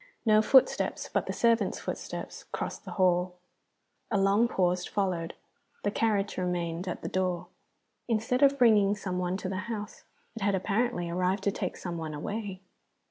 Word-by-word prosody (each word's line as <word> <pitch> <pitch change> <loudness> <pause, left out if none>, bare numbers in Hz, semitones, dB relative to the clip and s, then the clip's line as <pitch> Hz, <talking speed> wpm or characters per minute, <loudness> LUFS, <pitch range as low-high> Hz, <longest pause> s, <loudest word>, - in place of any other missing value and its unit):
No 215 -1 +6
footsteps 260 +4 +3
but - - 0
the - - -1
servant's 230 -4 +2
footsteps - - -6
crossed - - -4
the - - -6
hall. 180 -1 +2 0.7
Along 200 +2 +3
pause 180 -4 +1
followed, 180 -4 -1 0.5
the 205 - +1
carriage 210 -2 0
remaining 175 -1 -2
at 180 - -4
the - - -2
door. 185 -2 -1 0.6
Instead 235 +3 0
of 280 0 +5
bringing 210 -5 +5
some 185 -3 -3
one 180 +1 -1
to 195 - -5
the 190 0 -3
house, 210 -3 -6 0.3
it 225 - -7
had 200 0 +2
apparently 200 -1 0
arrived 180 +3 0
to 200 - +2
take - - -4
some 175 -2 -5
one 155 -2 -4
away. 195 +4 -4
195 Hz, 160 wpm, -29 LUFS, 180-215 Hz, 0.7 s, No